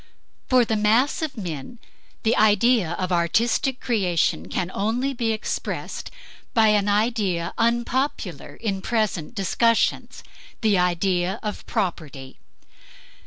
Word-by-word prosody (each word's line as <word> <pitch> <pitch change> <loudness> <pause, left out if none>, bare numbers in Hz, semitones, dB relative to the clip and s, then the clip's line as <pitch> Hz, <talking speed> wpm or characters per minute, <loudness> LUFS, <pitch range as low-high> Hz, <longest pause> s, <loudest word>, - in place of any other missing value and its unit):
For 255 -2 +4
the 220 - 0
mass 220 +9 +2
of 305 -5 -4
men 175 - -6 0.5
the 225 - +2
idea 215 -3 +3
of 185 +1 -3
artistic 225 +9 +1
creation 175 - 0
can 175 - -2
only 240 +7 -1
be 235 -3 -1
expressed 220 0 -4 0.5
by 220 -2 +5
an 205 -1 +2
idea 205 -5 0
unpopular 235 - -1
in 200 -4 -3
present 215 -4 -1
discussions 230 +3 +1 0.4
the 215 -3 +3
idea 180 +1 +1
of 210 -1 -4
property. 155 - -4
210 Hz, 115 wpm, -23 LUFS, 180-235 Hz, 0.5 s, by